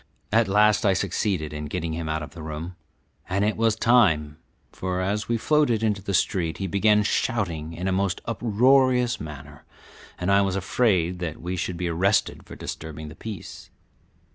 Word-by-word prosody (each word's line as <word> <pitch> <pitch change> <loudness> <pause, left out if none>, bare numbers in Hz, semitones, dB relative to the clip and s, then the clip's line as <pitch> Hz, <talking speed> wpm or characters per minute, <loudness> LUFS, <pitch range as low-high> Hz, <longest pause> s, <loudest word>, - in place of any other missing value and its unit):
At 115 0 +3
last 105 +2 +4
I 100 - +4
succeeded 95 -5 -1
in 75 0 -5
getting 85 0 -3
him 80 -1 -4
out 80 0 -2
of - - -9
the 85 - -9
room, 80 +3 -6 0.5
and 100 +3 +1
it 105 - +1
was 115 -1 +2
time, 90 -12 +3 0.3
for 90 0 -3
as 100 +3 -1
we 120 - +2
floated 125 -4 +2
into 105 -3 0
the 100 0 -2
street 85 -2 0
he 95 - -3
began 105 +3 +3
shouting 90 -8 -1
in 90 +3 -4
a - - +1
most 95 0 0
uproarious 125 +2 +3
manner, 75 -1 -9 0.5
and 90 +2 -1
I 100 0 +5
was 95 -1 0
afraid 90 -3 +1
that 85 -3 -4
we 90 +2 -4
should 90 -1 -3
be 90 0 -2
arrested 95 +5 0
for - - -9
disturbing 80 0 -7
the 80 - -11
peace. 110 -4 -8
95 Hz, 180 wpm, -25 LUFS, 80-110 Hz, 0.5 s, I